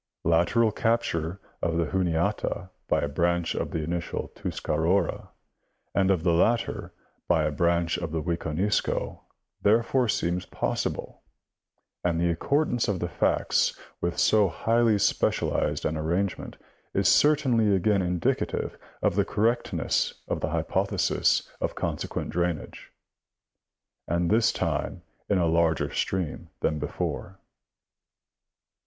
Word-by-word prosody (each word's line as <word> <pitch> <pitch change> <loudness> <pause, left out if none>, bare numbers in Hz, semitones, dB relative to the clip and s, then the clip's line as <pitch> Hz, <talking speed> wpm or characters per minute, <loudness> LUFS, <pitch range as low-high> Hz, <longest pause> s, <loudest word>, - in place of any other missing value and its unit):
Lateral 85 +8 +3
capture 100 -7 0 0.2
of 85 -1 0
the 85 - +2
Juniata 95 +1 -1 0.2
by - - +2
a - - 0
branch 85 +3 0
of - - -2
the 80 - -3
initial 85 +2 -3
Tuscarora, 85 +4 -1 0.6
and 95 -1 +2
of 90 -5 +2
the 85 - +3
latter 115 +8 +1 0.4
by 80 -3 +3
a 75 - 0
branch 85 +2 +1
of 85 -3 -4
the 80 - -1
Wiconisco 85 +4 -1 0.4
therefore 115 +4 +3
seems 90 -2 -1
pos - - -2
sible, - - -4 0.8
and 85 -2 +1
the 85 0 +2
accordance 125 - +1
of 105 - 0
the 85 - -1
facts - - +1 0.2
with 85 0 -1
so 105 -2 +4
highly 115 +4 +2
specialized 100 - +1
an 80 - 0
arrangement 85 +5 -2 0.4
is - - +3
certainly 125 -9 +4
again 100 +1 +2
indicative 90 -2 -1 0.2
of - - +2
the 100 - +3
correctness 115 +4 0
of - - -1
the - - -1
hypothesis - - +1
of - - -1
consequent - - -3
drainage, 85 -2 -3 1.2
and 85 +1 0
this 110 +1 +4
time - - -2 0.3
in 100 - +3
a 90 - +2
larger 85 -1 +2
stream 85 -2 -2
than 75 - 0
before. 90 +5 -4
90 Hz, 125 wpm, -27 LUFS, 85-105 Hz, 1.2 s, so